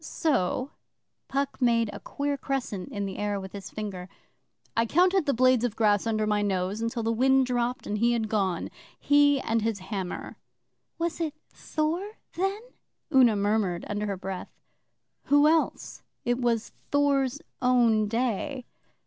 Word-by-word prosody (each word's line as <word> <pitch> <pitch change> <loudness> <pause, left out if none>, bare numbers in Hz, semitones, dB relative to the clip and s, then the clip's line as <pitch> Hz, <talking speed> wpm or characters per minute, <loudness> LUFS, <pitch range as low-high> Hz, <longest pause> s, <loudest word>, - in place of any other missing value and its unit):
So' 265 - 0 0.6
Puck 275 0 -2
made 230 -3 +3
a - - -7
queer 285 0 -2
crescent 260 -9 -3
in 200 -1 -3
the 195 - -5
air 205 -1 -1
with 190 -1 -8
his 195 -2 -8
finger 190 -4 -6 0.7
'I 230 0 +2
counted 360 - +3
the 280 - +3
blades 255 -1 +4
of 240 -3 -1
grass 210 -1 +2
under 215 -1 +1
my 210 -1 +1
nose 195 +2 -1
till 230 -2 -3
the 225 - +1
wind 265 +3 +4
dropped 245 0 -1
and 210 0 -2
he 235 +2 +3
had 225 -2 0
gone 195 -5 -1 0.3
he 285 -1 +4
and 225 0 0
his 225 -1 0
Hammer.' 190 -1 -5 0.6
'Was 335 -1 -2
it 310 -2 -2 0.2
Thor 335 +7 -2 0.2
then?' 390 +4 -1 0.5
Una 250 -5 +6
murmured 200 -3 0
under 210 0 -2
her 200 -2 -2
breath. 190 0 -6 0.8
'Who 290 +1 +5
else? 320 +1 0 0.2
It 245 +1 +1
was 235 -2 0 0.2
Thor's 285 -1 +2 0.2
own 235 -4 +3
day. 240 +2 -2
235 Hz, 155 wpm, -27 LUFS, 205-275 Hz, 0.8 s, Una